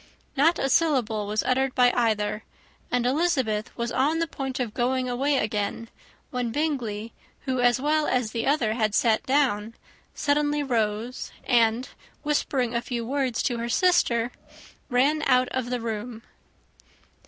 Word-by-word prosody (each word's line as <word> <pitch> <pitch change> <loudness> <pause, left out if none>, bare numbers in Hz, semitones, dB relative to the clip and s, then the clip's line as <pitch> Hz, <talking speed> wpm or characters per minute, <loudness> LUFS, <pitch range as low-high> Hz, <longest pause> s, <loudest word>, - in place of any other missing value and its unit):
Not 320 +5 +4
a 270 - 0
syllable 245 -9 +1
was 215 +1 0
uttered 260 +1 +1
by 245 -1 +5
either; 215 -3 0 0.5
and 245 -1 0
Elizabeth 260 -7 +1
was 235 0 -2
on 290 +5 +1
the 330 - +1
point 270 -4 -5
of 235 -4 -2
going 255 +1 0
away 270 +3 +1
again, 215 0 -2 0.4
when 245 -2 -2
Bingley, 235 -7 -2 0.3
who 260 -2 -2
as 245 0 +3
well 300 +2 +1
as 245 -4 0
the 230 +1 -2
other 270 -7 +2
had 215 -2 0
sat 225 -2 +3
down, 235 -6 +1 0.4
suddenly 295 0 +1
rose, 230 -1 -2
and, 235 0 +2 0.4
whispering 275 -5 0
a 235 - 0
few 240 -2 -4
words 260 -2 -1
to 240 -3 -1
her 235 +1 -3
sister, 240 -7 +2 0.6
ran 280 +5 +2
out 255 -1 +3
of 255 -2 -3
the 250 0 -1
room. 230 0 -5
250 Hz, 150 wpm, -25 LUFS, 230-275 Hz, 0.6 s, by